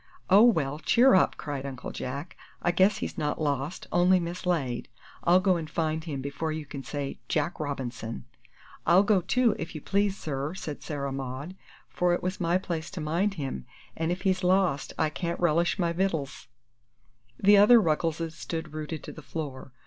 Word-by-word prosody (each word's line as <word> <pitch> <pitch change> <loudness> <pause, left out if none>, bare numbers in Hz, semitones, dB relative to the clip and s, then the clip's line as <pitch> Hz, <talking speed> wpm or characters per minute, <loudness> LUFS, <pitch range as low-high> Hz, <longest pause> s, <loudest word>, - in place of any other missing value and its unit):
"Oh, 200 +2 +8
well, 150 - +2
cheer 245 +10 +5
up!" 185 - +4
cried 145 -3 -4
Uncle 135 -2 -6
Jack. 140 +6 -5 0.2
"I 175 - +1
guess 190 +3 +3
he's - - -4
not 150 -1 -1
lost 145 +2 -2
only 180 +1 +4
mislaid. 170 -7 -2 0.3
I'll 175 +2 +5
go 185 -2 +3
and 160 -2 -5
find 160 -1 -1
him 140 -5 -4
before 140 +3 -3
you 155 -1 -4
can 140 -1 -7
say 140 0 -5
Jack 155 +2 -1
Robinson!" 125 - -4 0.6
"I'll 175 +4 +6
go, 205 -2 +3
too, 235 +6 +2
if 165 - -6
you 155 - -5
please, 200 +2 +1
sir," 145 +2 -3
said 150 -5 -6
Sarah 140 -2 -4
Maud, 135 +6 -5 0.3
"for 180 -1 +1
it - - -6
was 185 +1 -3
my 170 +1 +2
place 170 -4 -4
to 190 - -7
mind 170 +6 0
him, 135 - -5 0.3
an' 160 0 -1
if 180 +2 -2
he's 185 -1 +1
lost 180 -6 +2
I 155 - +1
can't 170 +2 -3
relish 170 0 +2
my 170 -2 0
vittles!" 165 -9 -2 0.9
The 205 +1 +6
other 215 +4 +8
Ruggleses 165 -2 0
stood 160 -2 -5
rooted 155 0 -5
to - - -7
the 155 - -11
floor. 140 -2 -6
160 Hz, 180 wpm, -28 LUFS, 145-185 Hz, 0.9 s, Oh